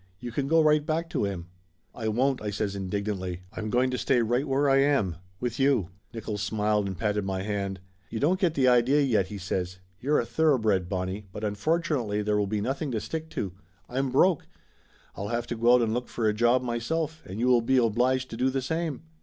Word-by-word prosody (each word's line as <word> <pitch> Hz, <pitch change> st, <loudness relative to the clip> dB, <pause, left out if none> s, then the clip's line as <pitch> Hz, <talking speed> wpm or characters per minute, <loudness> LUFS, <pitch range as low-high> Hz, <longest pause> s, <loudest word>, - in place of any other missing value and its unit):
You 120 Hz, +2 st, -6 dB
can 135 Hz, +4 st, -1 dB
go 165 Hz, +2 st, +5 dB
right 150 Hz, -1 st, +4 dB
back 165 Hz, +3 st, -2 dB
to -, -, 0 dB
him." 95 Hz, -4 st, -4 dB, 0.5 s
"I 110 Hz, -2 st, -4 dB
won't!" 130 Hz, +4 st, +1 dB
I 105 Hz, -, -2 dB
says 100 Hz, 0 st, -2 dB
indignantly. 95 Hz, -2 st, -3 dB
"I'm 110 Hz, 0 st, -3 dB
going 125 Hz, +3 st, +2 dB
to 125 Hz, -, -2 dB
stay 125 Hz, -3 st, +2 dB
right 120 Hz, +6 st, 0 dB
where 140 Hz, +1 st, +2 dB
I 135 Hz, 0 st, +5 dB
am. 135 Hz, -, +2 dB, 0.2 s
With 125 Hz, 0 st, -3 dB
you." 135 Hz, -10 st, +2 dB, 0.2 s
Nickolls 110 Hz, -2 st, -5 dB
smiled 105 Hz, 0 st, +1 dB
and 95 Hz, -2 st, -5 dB
patted 105 Hz, -2 st, 0 dB
my 95 Hz, -1 st, -2 dB
hand. 100 Hz, -2 st, -2 dB, 0.3 s
"You 110 Hz, -, -4 dB
don't 175 Hz, +8 st, +2 dB
get 175 Hz, -5 st, +1 dB
the 130 Hz, -2 st, +3 dB
idea, 125 Hz, +3 st, +4 dB
yet," 110 Hz, -9 st, +2 dB
he 105 Hz, -, -6 dB
says. 90 Hz, -1 st, -3 dB, 0.2 s
"You're 145 Hz, +4 st, +2 dB
a -, -, -1 dB
thoroughbred, 110 Hz, -, +2 dB
Bonnie, 95 Hz, +2 st, -3 dB
but 105 Hz, -, -7 dB
unfortunately 115 Hz, -1 st, 0 dB
there 105 Hz, 0 st, +1 dB
will 100 Hz, -, +1 dB
be 105 Hz, +1 st, -1 dB
nothing 135 Hz, +6 st, -2 dB
to 110 Hz, -, 0 dB
stick 160 Hz, +7 st, -5 dB
to. 95 Hz, -, -4 dB, 0.3 s
I'm 135 Hz, +2 st, -1 dB
broke. 165 Hz, +5 st, +3 dB, 0.7 s
I'll 100 Hz, -, -4 dB
have 120 Hz, +1 st, -1 dB
to 120 Hz, -, -4 dB
go 120 Hz, +2 st, +5 dB
out 125 Hz, -, +3 dB
and 110 Hz, -1 st, 0 dB
look 125 Hz, +1 st, -2 dB
for 115 Hz, -2 st, -1 dB
a 105 Hz, -, +3 dB
job 120 Hz, +3 st, +3 dB
myself, 155 Hz, +7 st, -2 dB
and 95 Hz, +4 st, -6 dB
you 120 Hz, -, +1 dB
will 125 Hz, -2 st, +5 dB
be 130 Hz, +3 st, +2 dB
obliged 125 Hz, +2 st, +2 dB
to 115 Hz, -, -5 dB
do 130 Hz, +2 st, +2 dB
the 135 Hz, 0 st, -2 dB
same." 160 Hz, +1 st, -2 dB
120 Hz, 220 wpm, -27 LUFS, 105-135 Hz, 0.7 s, go